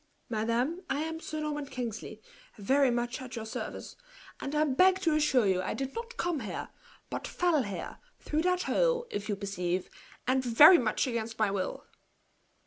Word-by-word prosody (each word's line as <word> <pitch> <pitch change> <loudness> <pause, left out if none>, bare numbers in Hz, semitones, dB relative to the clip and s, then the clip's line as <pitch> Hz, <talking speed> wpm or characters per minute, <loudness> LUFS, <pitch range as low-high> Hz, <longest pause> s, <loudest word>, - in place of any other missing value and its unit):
"Madame, 235 +9 0
I 275 +2 0
am 320 +1 -3
Sir 310 -1 -5
Norman 295 -2 -3
Kingsley, 225 -4 -6 0.3
very 265 +6 +3
much 240 +1 -2
at 255 -1 -7
your 225 -2 -5
service; 220 - -6 0.4
and 280 +2 -4
I 300 - +4
beg 365 +7 +4
to 330 -4 +2
assure 295 -6 +3
you 185 -2 +2
I 185 - -3
did 270 0 -4
not 470 +1 -6
come 345 -4 -1
here, 210 -7 -5 0.4
but - - -4
fell 345 -5 +2
here, 200 -6 -6 0.2
through 305 +1 -1
that 360 +1 +1
hole, - - +1
if 205 +2 -4
you 205 - +1
perceive, 185 -3 -3 0.4
and 260 +1 +2
very 290 +9 +8
much 230 +3 +1
against 230 -3 -3
my 215 -2 +2
will." 195 -2 -3
260 Hz, 175 wpm, -30 LUFS, 220-310 Hz, 0.4 s, very